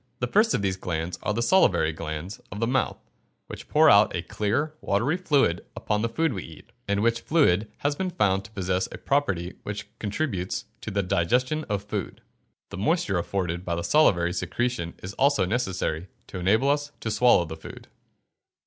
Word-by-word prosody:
The 125 - 0
first 215 - +3
of - - -1
these 95 -1 0
glands 85 -1 -3
are - - -1
the 115 +3 0
salivary 95 - +3
glands 80 +5 -6
of 100 - -6
the 115 - +1
mouth, 130 +3 0 0.5
which - - -9
pour 155 +1 +5
out 105 -6 +6
a 85 - -2
clear 105 +11 -1
watery 120 - +1
fluid 145 - +2
upon 105 0 -1
the 115 - 0
food 160 +3 0
we 95 - -4
eat, 80 - -13 0.2
and 100 0 +1
which 115 0 +2
fluid 110 - +2
has 145 0 -1
been 185 +4 -2
found 100 - +1
to 95 - -13
possess 95 -2 -1
a - - -7
property 95 -12 0
which 105 0 -5
contributes 100 - -2 0.2
to - - -5
the 100 -1 0
digestion 125 - +1
of 100 -1 -1
food. 105 - -5 0.5
The 100 - -7
moisture 110 - +1
afforded 90 -1 -2
by 85 -2 -2
the 85 - -3
salivary 85 - +3
secretion 115 -2 -2
is 95 +2 -6
also 140 -6 +4
necessary 95 -6 -2 0.2
to 90 - -7
enable 110 +10 +3
us 145 0 -1
to 110 - -2
swallow 105 -4 +4
the 80 0 -7
food. 80 - -11
105 Hz, 185 wpm, -26 LUFS, 90-130 Hz, 0.5 s, out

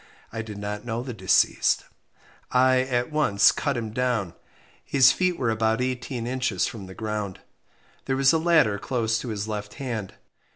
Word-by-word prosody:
I 115 - -3
did 110 -2 -8
not 105 +1 -5
know 120 0 -3
the 125 -1 -6
deceased. 95 -4 +2 0.6
I 130 0 +4
at 130 +1 -1
once 110 -9 +4
cut 140 -4 -2
him 110 -2 -4
down. 115 -6 -1 0.5
His 135 -1 +5
feet 180 +3 0
were 120 -4 0
about 110 +1 +1
18 125 -1 -3
inches 125 -6 0
from 100 -5 -6
the 95 - -11
ground. 105 -4 -4 0.6
There 135 -1 -1
was 135 +2 +4
a 160 - +3
ladder 155 -12 +3
close 115 -3 -1
to - - -6
his 105 -2 -3
left 105 -1 -5
hand. 115 -8 -5
115 Hz, 170 wpm, -25 LUFS, 105-130 Hz, 0.6 s, His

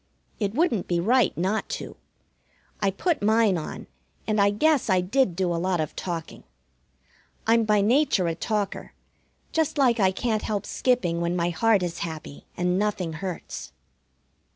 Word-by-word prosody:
It 205 0 -1
wouldn't 270 - +1
be 175 -1 +1
right 235 +4 +2
not 190 +6 -1
to. - - -8 0.9
I 200 - +3
put 310 - -1
mine 215 -1 +3
on, 160 - -5 0.4
and 215 -1 +1
I 200 - +5
guess 265 +5 +2
I 185 -1 +4
did 195 +1 +1
do 180 -1 0
a 165 - -2
lot 185 -1 0
of 155 - -3
talking. 170 -3 -5 1.0
I'm 225 0 +4
by 210 -1 +3
nature 230 -3 +3
a 165 - 0
talker, 205 +3 -3 0.6
just 320 -1 0
like 245 -4 +3
I 190 -2 +5
can't 215 +2 -1
help 205 -2 -2
skipping 180 -10 0
when 170 +1 0
my 175 0 0
heart 200 +3 +3
is 175 -1 -3
happy 155 -3 -7
and 180 +1 +1
nothing 195 -5 -1
hurts. 160 - -6
200 Hz, 160 wpm, -25 LUFS, 175-225 Hz, 1.0 s, I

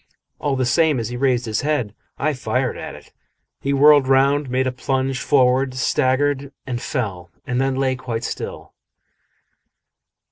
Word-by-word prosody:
All 145 -2 0
the 130 -1 0
same, 155 +1 +3
as 115 -1 -3
he 120 - -5
raised 125 -1 +1
his 110 -2 -1
head, 145 -8 -1 0.2
I 155 +1 0
fired 125 0 -1
at - - -7
it. - - -16 0.5
He 140 - -2
whirled 145 0 +6
round, 135 +1 +3
made 130 +1 +1
a 130 - 0
plunge 130 0 -2
forward, 130 -1 +2
staggered 135 +2 +1
and 120 -2 -4
fell, 95 - -3 0.2
and 125 +1 -1
then 135 0 0
lay 130 -1 +1
quite 125 -3 -4
still. - - -6
130 Hz, 155 wpm, -21 LUFS, 125-140 Hz, 0.5 s, whirled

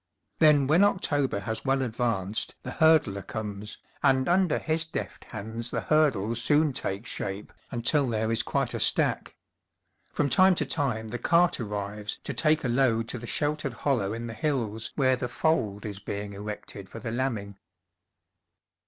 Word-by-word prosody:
Then 150 -3 +6
when 160 +8 +4
October 145 - +1
has 110 +1 -4
well 135 0 +1
advanced 110 -4 -2
the - - -5
hurdler 155 -12 +3
comes, 105 +1 -6 0.2
and 130 -1 +3
under 180 -1 +3
his 160 0 +2
deft 165 - -6
hands 110 +2 -5
the - - -2
hurdles 120 -8 +2
soon 150 +2 +3
take 100 -2 -3
shape 100 -2 -4 0.2
until 130 +3 +1
there 110 0 0
is 115 - +2
quite - - -1
a - - -3
stack. - - +1 0.8
From 145 - 0
time 185 +8 +5
to - - 0
time 120 -8 -1
the 120 - -4
cart 170 -1 +3
arrives 105 -1 -4
to 140 - -4
take 155 +5 +2
a - - 0
load 120 -2 +2
to 125 - -3
the 120 - -8
sheltered 150 -2 -1
hollow 115 -5 0
in 115 +1 -4
the 115 - -6
hills 115 -4 -2
where 130 -2 +3
the 125 0 -3
fold 110 -8 0
is 100 -2 -5
being 100 0 -5
erected 100 -1 -7
for - - -9
the 115 0 -5
lambing. 110 -6 -3
120 Hz, 165 wpm, -27 LUFS, 105-145 Hz, 0.8 s, Then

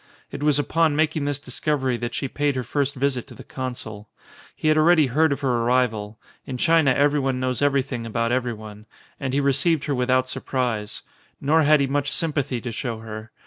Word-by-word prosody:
It - - -6
was 150 -1 +3
upon 155 +1 +2
making 155 -1 +1
this 145 -1 -1
discovery 130 -1 -1
that 120 0 -4
she 135 - -2
paid 145 +1 -1
her 130 - -2
first 140 +3 -1
visit 130 -2 -1
to - - -12
the - - -11
consul. 110 -5 -7 0.5
He - - -2
had 155 - +5
already 155 0 +5
heard 150 +5 +2
of 140 - -2
her 130 -3 +1
arrival 115 -3 0
' - - -36
in 130 - -4
China 160 +1 +4
everyone 140 -1 +2
knows 130 0 -1
everything 135 -4 0
about 115 +1 -1
everyone 110 -4 -4
— - - -30
and 130 -2 -2
he 140 - +1
received 140 +3 +2
her 145 - -1
without 130 0 +1
sur - - -5
prise. 120 -6 -2 0.4
Nor 155 +3 +3
had 150 -1 +5
he - - +3
much 140 +1 -1
sympathy 145 -6 -1
to 120 - -5
show 115 0 -4
her. 110 0 -8
130 Hz, 205 wpm, -23 LUFS, 120-145 Hz, 0.5 s, had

